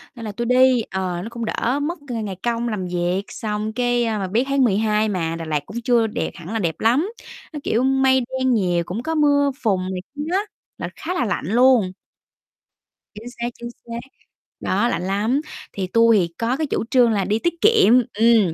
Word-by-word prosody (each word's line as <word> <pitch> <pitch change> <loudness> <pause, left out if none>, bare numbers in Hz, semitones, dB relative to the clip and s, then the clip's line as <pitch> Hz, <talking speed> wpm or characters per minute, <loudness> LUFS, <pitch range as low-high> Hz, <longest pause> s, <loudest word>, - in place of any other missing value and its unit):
nên 230 -2 -8
là 215 - -4
tui 235 +4 -4
đi, 250 0 +4
ờ, 185 -2 -2
nó 220 - -6
cũng 235 0 -5
đỡ 250 +5 -1
mất 325 +4 -3
cái 230 -3 -3
ngày 195 -3 -4
công 235 0 -1
làm 205 -4 -3
việc, 175 +2 -1
xong 215 0 -4
cái, 245 0 +1
à, 220 -1 -1
mà 190 - -2
biết 220 +6 +1
tháng 275 -1 +2
12 215 0 +2
mà 165 -4 -2
Đà 165 - -6
Lạt 155 -2 0
cũng 235 +8 -6
chưa 235 -1 +3
đẹp 215 - -3
hẳn 175 +3 -8
là 225 - 0
đẹp 165 -5 -1
lắm, 260 - +2 0.4
nó, 300 - -4
kiểu, 230 +3 +1
mây 265 0 +3 0.2
đen 260 -1 +2
nhiều, 180 -6 +1
cũng 210 +7 -5
có 320 +2 -2
mưa 285 -2 +3
phùn 195 -4 +2
này 185 - -4
kia 295 - -5
á, 380 - +3 0.4
là - - -4
khá 350 +3 -4
là 255 - 0
lạnh 200 - -2
luôn. 235 -3 +4 1.2
Chính 220 +3 -9
xác, 235 +1 -1
chính 235 0 -6
xác, 235 -1 -8 0.6
đó 205 +5 +1
lạnh 175 -5 -2
lắm. 210 +9 0 0.3
Thì 190 -2 -3
tui 230 +3 +4
thì 170 -3 0
có 235 +3 0
cái 310 - -1
chủ - - -1
trương 245 -3 +5
là 200 -3 0
đi 210 +3 0
tiết 345 +6 0
kiệm, 430 - +5 0.2
ừm, 220 -5 +4
230 Hz, 215 wpm, -21 LUFS, 195-250 Hz, 1.2 s, trương